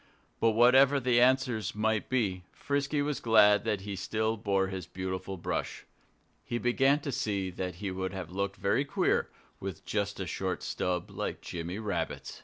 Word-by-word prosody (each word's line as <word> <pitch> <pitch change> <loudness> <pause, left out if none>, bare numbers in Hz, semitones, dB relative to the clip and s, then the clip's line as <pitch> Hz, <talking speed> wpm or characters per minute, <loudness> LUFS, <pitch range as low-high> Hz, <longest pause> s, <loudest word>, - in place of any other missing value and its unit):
But 115 -1 +3
whatever 130 +4 +6
the 120 -2 +3
answers 125 -4 +2
might 110 0 0
be, 105 -8 0
Frisky 145 +1 -1
was 145 -1 -2
glad 105 -3 +5
that 105 -3 0
he 100 0 -5
still 110 +3 -1
bore 100 -3 +1
that 95 -2 -6
beautiful 95 +1 -4
brush. 85 - -3 0.6
He 120 - -3
began 135 +4 +3
to 140 - -3
see 100 -6 -1
that 90 0 -4
he 95 +2 -4
would 95 0 -3
have 95 -3 -6
looked 100 +1 -2
very 100 +8 +1
queer, 140 - +1 0.3
with 95 -4 -6
just 100 -1 -2
a 95 - -2
short 95 +2 -3
stub 90 -1 -2
like - - -4
Jimmy 85 +2 -5
Rabbit's. 105 -2 -4
105 Hz, 170 wpm, -30 LUFS, 95-120 Hz, 0.6 s, whatever